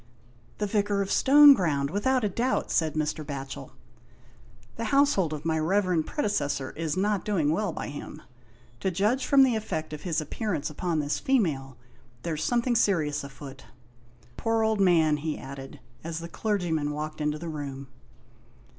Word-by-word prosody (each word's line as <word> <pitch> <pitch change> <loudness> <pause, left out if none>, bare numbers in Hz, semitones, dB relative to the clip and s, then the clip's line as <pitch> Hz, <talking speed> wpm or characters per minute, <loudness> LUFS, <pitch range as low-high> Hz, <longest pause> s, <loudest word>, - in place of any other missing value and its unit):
" 120 - -30
The 210 - -1
Vicar 205 -1 0
of 195 - -7
Stoneground, 205 - +6
without 250 +6 +1
a 210 - +1
doubt," 240 +7 -1
said 160 -2 +1
Mr. 155 0 -1
Batchel. 140 -1 -6 1.1
"The 230 - -4
household 250 - +3
of 155 0 -6
my 160 -1 +1
reverend 180 -1 +1
predecessor 145 - -1
is 165 +1 -3
not 205 0 +1
doing 170 -8 +1
well 200 +3 0
by - - -5
him; 145 - -8 0.6
to 190 - 0
j 190 +3 -1
udge 255 +5 +2
from 275 -1 +6
the 255 -3 +3
effect 160 -8 -4
of 150 - -6
his 170 -3 -1
appearance 155 -1 -3
upon 170 +2 -2
this 145 0 -2
female, 150 - 0 0.5
there's 160 -3 -2
something 240 0 +1
serious 155 -10 +1
afoot. 135 0 -10 0.7
Poor 225 0 +1
old 220 -1 +1
man," 165 -5 +4
he 155 +1 -3
added, 135 +1 -9 0.2
as 165 0 -4
the 165 0 -5
clergy 195 -1 -2
man 150 -2 0
walked 150 +1 -5
into 150 0 0
the 170 +2 -7
room. 140 -3 -6
165 Hz, 165 wpm, -27 LUFS, 150-210 Hz, 1.1 s, Stoneground